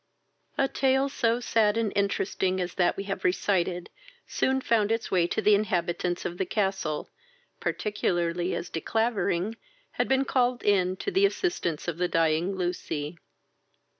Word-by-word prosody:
A 270 - +3
tale 265 +1 +2
so 235 -3 +1
sad 225 -3 +2
and 225 -3 0
interesting 190 -2 0
as 180 -1 -2
that 175 -2 +1
we 195 - -3
have 195 0 -4
recited 180 -1 0 0.3
soon 265 0 +1
found 225 -4 +1
its 225 0 -1
way 175 -2 +3
to - - -2
the 210 - +6
inhabitants 180 -3 0
of 175 - -4
the 190 - +1
castle, 190 -7 -1 0.5
particularly 175 -4 -1
as 175 - -5
De 165 - -3
Clavering 220 -2 0 0.3
had - - -1
been 265 0 +2
called 250 -2 +1
in 185 -3 +2
to 400 - -4
the 395 +1 +5
assistance 345 - -2
of 175 -1 -3
the 180 - +2
dying 165 +3 +1
Lucy. 175 -3 -3
195 Hz, 155 wpm, -27 LUFS, 175-225 Hz, 0.5 s, the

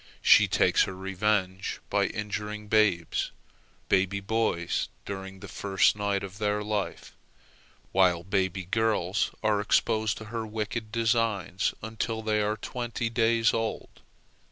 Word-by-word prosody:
She - - +7
takes - - +3
her 95 - -6
revenge 95 0 -1
by - - +2
injuring 105 0 -4
babes—baby 95 -1 0
boys 100 -5 0 0.2
during 95 -1 -7
the 100 - -8
first 95 -1 +2
night 100 -1 -1
of 100 +2 -8
their 105 0 0
life, 105 -1 -3 0.8
while 90 -3 +3
baby 95 -1 -1
girls 105 -1 +1
are 105 -1 +2
exposed 110 +1 +1
to 110 - -8
her 115 -1 -2
wicked 110 0 -4
designs 115 -5 0
until 110 0 -3
they 105 -1 +1
are 105 +1 0
twenty 120 +1 -3
days 115 0 +3
old. 115 -1 -3
105 Hz, 125 wpm, -28 LUFS, 95-110 Hz, 0.8 s, She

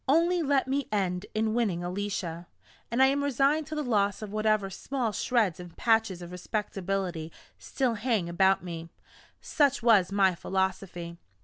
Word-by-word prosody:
Only 335 +5 +3
let 280 -4 +2
me 275 +1 -1
end 190 -2 -1
in 220 0 +1
winning 205 -8 0
Alicia, 180 -2 -4 0.4
and 240 +3 +3
I - - +8
am 280 +1 +2
resigned 285 +3 +2
to 310 - -5
the 300 - -1
loss 205 -4 +1
of 210 - -6
whatever 215 -2 +1
small 250 +3 -2
shreds 215 -5 +1
and 175 -1 -11
patches 220 -6 +1
of 175 - -9
respectability 185 -3 -3 0.3
still 260 -4 -1
hang 220 -5 0
about 190 +3 +3
me 165 -2 -6 0.5
such 285 -6 +1
was 205 -6 +5
my 195 -2 +3
philosophy. 180 -2 -3
205 Hz, 155 wpm, -28 LUFS, 180-250 Hz, 0.5 s, I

